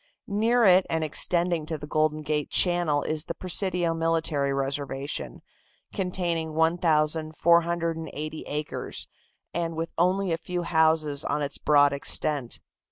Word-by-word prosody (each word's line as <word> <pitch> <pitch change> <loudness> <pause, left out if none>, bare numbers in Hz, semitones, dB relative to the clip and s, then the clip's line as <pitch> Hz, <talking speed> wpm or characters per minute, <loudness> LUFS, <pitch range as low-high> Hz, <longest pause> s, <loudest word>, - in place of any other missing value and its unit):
Near 230 +2 +2
it 185 -1 +6
and 160 -1 0
extending 170 +1 0
to 160 -1 -3
the 150 - -8
Golden 155 0 0
Gate 150 -1 -1
channel 175 -5 +3
is 155 +1 -1
the - - -5
Presidio 180 -2 0
military 165 -4 0
reservation, 135 +1 -3 0.5
containing 175 -5 -2
1,480 160 0 +1
acres, 150 +1 -3 0.5
and 165 -1 -2
with 165 +1 -3
only 185 +1 +2
a 165 - -1
few 175 +1 -4
houses 160 -3 +2
on 150 - -1
its 140 0 -4
broad 145 -1 +4
extent. 140 -2 -1
160 Hz, 125 wpm, -26 LUFS, 150-175 Hz, 0.5 s, it